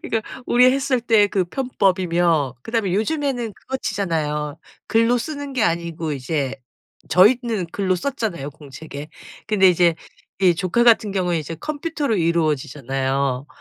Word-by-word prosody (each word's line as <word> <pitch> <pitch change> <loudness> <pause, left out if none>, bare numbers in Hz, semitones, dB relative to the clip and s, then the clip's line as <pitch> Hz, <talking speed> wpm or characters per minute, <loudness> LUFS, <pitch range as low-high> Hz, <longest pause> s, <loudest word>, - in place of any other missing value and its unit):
그러니까 225 -10 -1 0.2
우리 250 +1 +5
했을 270 -2 0
때 225 -3 +4
그 190 -3 0
편법이며 175 - +1
그다음에 225 -5 -1
요즘에는 245 -1 -1
그거 265 - -5
치잖아요. 150 - -2 0.3
글로 230 +2 +3
쓰는 285 +1 -5
게 255 -4 0
아니고 165 -2 -1
이제 135 0 -2 0.5
저희는 215 +1 +3
글로 190 -2 0
썼잖아요 205 - -3
공책에. 145 0 -10 0.4
근데 195 -3 +4
이제 175 -1 +4 0.5
이 180 -3 +5
조카 185 +6 +1
같은 220 -4 +4
경우에 180 -3 0
이제 160 +1 -5
컴퓨터로 295 - -2
이루어지잖아요. 140 -5 -1
185 Hz, 330 characters per minute, -21 LUFS, 155-235 Hz, 0.5 s, 우리